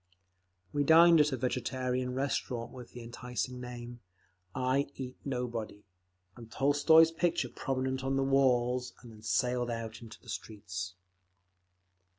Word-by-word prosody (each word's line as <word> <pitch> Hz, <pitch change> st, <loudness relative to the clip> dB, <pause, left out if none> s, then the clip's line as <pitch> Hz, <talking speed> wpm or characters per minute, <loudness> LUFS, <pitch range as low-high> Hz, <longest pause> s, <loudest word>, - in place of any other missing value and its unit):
We 145 Hz, -, +2 dB
dined 165 Hz, +2 st, +7 dB
at 150 Hz, 0 st, +2 dB
a 130 Hz, -, -1 dB
vegetarian 125 Hz, 0 st, -1 dB
restaurant 130 Hz, -3 st, -2 dB
with 125 Hz, -2 st, -10 dB
the 120 Hz, -, -10 dB
enticing 125 Hz, +1 st, -4 dB
name, 120 Hz, -1 st, -8 dB, 0.6 s
"I 130 Hz, +2 st, +1 dB
Eat 130 Hz, -1 st, -6 dB
Nobody," 120 Hz, -6 st, -4 dB, 0.5 s
and 115 Hz, -2 st, -12 dB
Tolstoy's 145 Hz, +4 st, +5 dB
picture 165 Hz, -5 st, 0 dB
prominent 130 Hz, 0 st, -2 dB
on 135 Hz, 0 st, 0 dB
the 135 Hz, -, +2 dB
walls, 125 Hz, -2 st, +2 dB
and 120 Hz, -, -11 dB
then 110 Hz, -1 st, -14 dB
sallied 125 Hz, +2 st, 0 dB
out 115 Hz, -1 st, -5 dB
into 115 Hz, -1 st, -11 dB
the -, -, -22 dB
streets. 95 Hz, -4 st, -6 dB
125 Hz, 135 wpm, -31 LUFS, 120-135 Hz, 0.6 s, dined